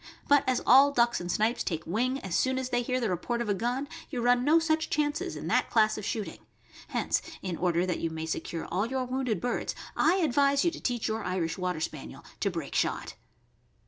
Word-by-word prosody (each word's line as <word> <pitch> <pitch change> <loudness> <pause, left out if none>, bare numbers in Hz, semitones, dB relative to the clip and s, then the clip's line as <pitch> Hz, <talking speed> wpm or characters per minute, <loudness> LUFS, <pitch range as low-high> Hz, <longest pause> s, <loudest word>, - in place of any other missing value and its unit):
But 285 -1 +5
as 255 - 0
all 275 +3 +7
ducks 240 -5 +2
and 175 0 -3
snipes 220 +5 +1
take 165 -2 -3
wing 250 +8 0
as 190 -3 -6
soon 260 0 +2
as. 260 -1 -2
they 245 -1 +1
hear 255 +1 -1
the 230 -5 -1
report 235 +7 -2
of 235 -3 -2
a - - +3
gun, 245 +8 -2 0.2
you 255 - -4
run 245 +1 +3
no 305 +5 +5
such 320 -1 +1
chances 295 0 -1
in - - -6
that - - +1
class 215 -1 +3
of 215 - -6
shooting; 210 +1 -4 0.5
hence, - - 0 0.2
in 185 -3 -2
order 175 0 +1
that 180 -2 -2
you 165 - -1
may 160 0 -5
secure 160 +1 -4
all 195 +5 -1
your 260 +1 -2
wounded 250 -5 -1
birds, 245 +4 -2 0.2
I 325 +4 +4
advise 280 -4 +2
you 340 - +3
to 330 - -9
teach 245 -3 -1
your 220 0 -2
Irish 180 -3 -1
Water 180 -3 -2
Spaniel 155 -3 -6
to - - +1
break - - -5
shot. - - -1
240 Hz, 220 wpm, -29 LUFS, 185-265 Hz, 0.5 s, all